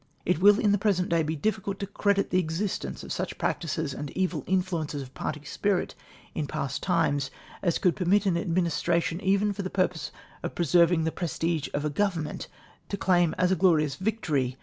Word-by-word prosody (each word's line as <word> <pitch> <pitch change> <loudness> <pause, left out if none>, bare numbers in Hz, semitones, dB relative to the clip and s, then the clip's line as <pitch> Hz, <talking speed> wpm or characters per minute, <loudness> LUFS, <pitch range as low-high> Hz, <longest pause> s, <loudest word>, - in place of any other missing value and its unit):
It 180 -2 +1
will 205 +2 +7
in 210 - +3
the 205 - +2
jDresent 190 -3 +1
day 170 -1 +3
be 155 +1 -1
difficidt 195 +2 -1
to 200 - -3
credit 200 0 0
the 185 - +3
existence 180 +4 -3
of - - -4
such - - -3
practices 155 -3 -2
and 145 0 -5
evil 180 -6 0
influences 170 -6 -1
of 130 0 -13
party 150 -1 -4
spirit 195 +4 0 0.4
in 150 -2 -2
past 140 -2 -3
times 160 -6 +1 0.3
as 175 -3 +1
could 180 - +2
permit 195 +3 +2
an 185 -3 +2
Administration, 170 -1 0
even 200 +2 +2
for 200 - -4
the 185 - -3
purpose 180 -7 0 0.3
of - - -5
pre 175 - 0
serving 170 0 +4
the 160 - 0
|97'(3s%d 165 -3 -2
of 145 +1 -1
a 150 - 0
Government 165 -3 -1 0.4
to 200 - -2
claim 175 -4 +2
as 180 0 +2
a - - +4
glorious 160 -5 +3
victory 150 - -1
175 Hz, 195 wpm, -27 LUFS, 155-190 Hz, 0.4 s, will